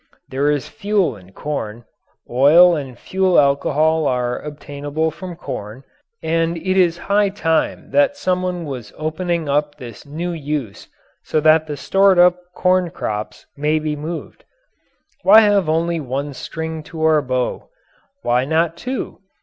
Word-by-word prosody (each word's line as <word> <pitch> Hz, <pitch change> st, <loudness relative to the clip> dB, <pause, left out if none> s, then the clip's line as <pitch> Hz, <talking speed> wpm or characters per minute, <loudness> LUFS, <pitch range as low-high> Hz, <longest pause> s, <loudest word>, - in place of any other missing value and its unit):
There 140 Hz, +2 st, 0 dB
is 145 Hz, -3 st, -1 dB
fuel 205 Hz, -, 0 dB
in 95 Hz, -2 st, -16 dB
corn; 115 Hz, -3 st, -5 dB, 0.4 s
oil 160 Hz, +8 st, +6 dB
and 135 Hz, -5 st, -6 dB
fuel 190 Hz, -1 st, +2 dB
alcohol 150 Hz, +2 st, +2 dB
are 125 Hz, -1 st, -1 dB
obtainable 145 Hz, +1 st, -4 dB
from 180 Hz, +2 st, -8 dB
corn, 110 Hz, -6 st, -7 dB, 0.4 s
and 165 Hz, +1 st, 0 dB
it 185 Hz, +3 st, -1 dB
is 175 Hz, -3 st, +3 dB
high 200 Hz, +2 st, +1 dB
time 165 Hz, -5 st, -1 dB
that 285 Hz, 0 st, +3 dB
someone 180 Hz, -, -1 dB
was 125 Hz, -7 st, -7 dB
opening 160 Hz, +1 st, -2 dB
up 145 Hz, +1 st, 0 dB
this 120 Hz, -4 st, -10 dB
new 165 Hz, +5 st, -4 dB
use 145 Hz, -9 st, -4 dB, 0.4 s
so -, -, 0 dB
that 155 Hz, +1 st, +4 dB
the 145 Hz, -1 st, -5 dB
stored 195 Hz, +5 st, +3 dB
up 180 Hz, 0 st, +5 dB, 0.2 s
corn 185 Hz, -1 st, +2 dB
crops 105 Hz, -8 st, -5 dB
may 150 Hz, +2 st, +1 dB
be 155 Hz, -1 st, -2 dB
moved. 160 Hz, +3 st, -7 dB, 0.8 s
Why 220 Hz, -, +8 dB
have 205 Hz, -6 st, +3 dB
only 165 Hz, +1 st, 0 dB
one 140 Hz, +1 st, -4 dB
string 160 Hz, +3 st, -5 dB
to 160 Hz, -2 st, -5 dB
our 155 Hz, -1 st, +4 dB
bow? 130 Hz, -2 st, -2 dB, 0.5 s
Why 125 Hz, +1 st, +2 dB
not 160 Hz, +3 st, 0 dB
two? 255 Hz, +6 st, -5 dB
155 Hz, 145 wpm, -19 LUFS, 140-175 Hz, 0.8 s, Why